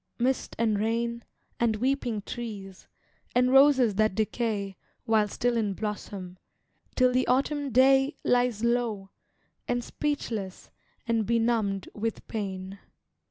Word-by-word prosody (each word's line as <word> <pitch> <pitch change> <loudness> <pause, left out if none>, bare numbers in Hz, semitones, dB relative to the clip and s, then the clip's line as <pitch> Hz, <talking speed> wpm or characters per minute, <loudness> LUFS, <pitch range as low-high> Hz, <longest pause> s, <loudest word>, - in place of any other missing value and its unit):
mist 255 +2 -1
and 220 -3 +1
rain, 235 +2 -1 0.4
And 230 -2 +2
weeping 245 -3 -1
trees, 200 -5 -7 0.5
and 250 +1 +4
roses 270 -5 +6
that 215 -3 +2
decay 215 -3 -1 0.3
While 220 -2 +3
still 245 +3 -1
in 210 -4 0
blossom, 195 -3 -6 0.6
till 255 -1 +4
the 255 0 +1
autumn 280 +3 +1
day 270 +3 +4
Lies 245 -3 +1
low, 235 -5 0 0.6
and 245 0 -1
speechless, 225 -12 -4 0.3
and 230 -2 0
benumbed 225 -4 +1
with 225 +1 -4
pain. 195 -2 -5
230 Hz, 115 wpm, -27 LUFS, 205-250 Hz, 0.6 s, roses